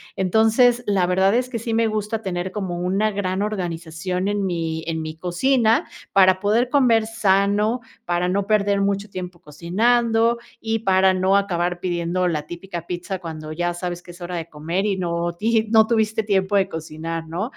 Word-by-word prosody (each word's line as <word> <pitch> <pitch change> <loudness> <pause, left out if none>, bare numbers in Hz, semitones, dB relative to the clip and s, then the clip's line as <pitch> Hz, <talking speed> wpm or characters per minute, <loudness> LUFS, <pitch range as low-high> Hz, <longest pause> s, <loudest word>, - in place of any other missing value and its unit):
Entonces, 225 +5 +3
la 195 -3 +2
verdad 190 +3 +2
es 250 +1 +1
que 245 -2 -4
sí 230 0 -2
me 230 0 +3
gusta 215 0 -2
tener 185 -1 -3
como 185 -4 -4
una 195 +4 +1
gran 195 -1 -2
organización 180 -2 -3
en 205 -1 -1
mi 165 -2 -2
en 160 -1 -2
mi 155 0 -6
cocina, 220 +8 +2 0.2
para 185 -1 +5
poder 220 +5 +1
comer 240 -6 +4
sano, 210 +1 +1 0.2
para 175 -1 0
no 195 +1 0
perder 205 -2 +2
mucho 200 +1 -1
tiempo 180 -2 -7
cocinando 225 +9 +1 0.2
y 225 0 -1
para 190 -2 +3
no 190 +1 +3
acabar 175 -3 -1
pidiendo 175 0 -1
la 155 -3 -2
típica 175 -1 -7
pizza 180 +2 -4
cuando 155 -3 -7
ya 175 +2 -2
sabes 175 0 -4
que 180 - -18
es 175 +1 -12
hora 175 0 -4
de 165 0 -6
comer 165 +7 -2
y 195 -2 0
no 170 -1 -2
ti 225 +6 +1
y - - 0
no 220 -1 +6
tuviste 220 -1 +1
tiempo 200 -1 +1
de 195 -1 +3
cocinar, 160 -1 -6
¿no? 170 +5 -3
190 Hz, 185 wpm, -22 LUFS, 175-215 Hz, 0.2 s, no